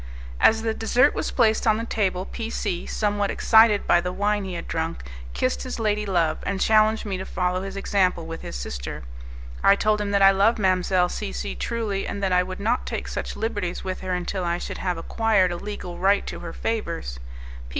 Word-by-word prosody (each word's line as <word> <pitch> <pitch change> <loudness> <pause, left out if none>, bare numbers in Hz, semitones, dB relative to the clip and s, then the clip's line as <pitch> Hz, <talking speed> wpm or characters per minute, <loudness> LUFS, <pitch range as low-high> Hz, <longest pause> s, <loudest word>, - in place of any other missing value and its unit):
As 220 0 +4
the 225 -1 0
dessert 245 +5 +3
was - - -2
placed 225 -2 +2
on 215 -1 +4
the 225 - -3
table, 190 -5 -1
P 225 +1 -5
C, 175 -6 -3
somewhat 205 -1 0
excited 220 -2 +5
by 175 - +4
the 180 +1 -3
wine 205 +2 0
he 185 -2 -5
had 170 - -6
drunk, 165 - -3 0.3
kissed 65 +1 0
his - - -5
lady 210 -1 0
love, 170 -5 +1
and 200 -1 -3
challenged 220 +2 +3
me 195 -3 -3
to - - -4
follow 180 -1 -1
his 195 0 -6
example 185 -4 +1
with 165 0 -7
his - - -7
sister. - - -5 0.6
I 195 - +7
told 210 +1 +1
him 205 - -2
that 200 -1 +3
I 195 - +9
loved 200 +4 +3
Mdlle. 185 -2 +2
C - - -4
C - - -4
truly, 200 - -3
and 200 - -4
that 190 - +1
I 180 - +5
would 185 +1 -5
not 230 +5 0
take - - -4
such - - -4
liberties 205 -6 -3
with 185 -1 -4
her 185 -1 -3
until 180 +1 -3
I 170 0 0
should - - -6
have 180 -2 -1
acquired 200 +1 +2
a 175 - -3
legal 180 -3 -7
right 195 +2 +3
to - - -6
her 170 - -7
favours. 170 - -3
195 Hz, 210 wpm, -24 LUFS, 180-215 Hz, 0.6 s, I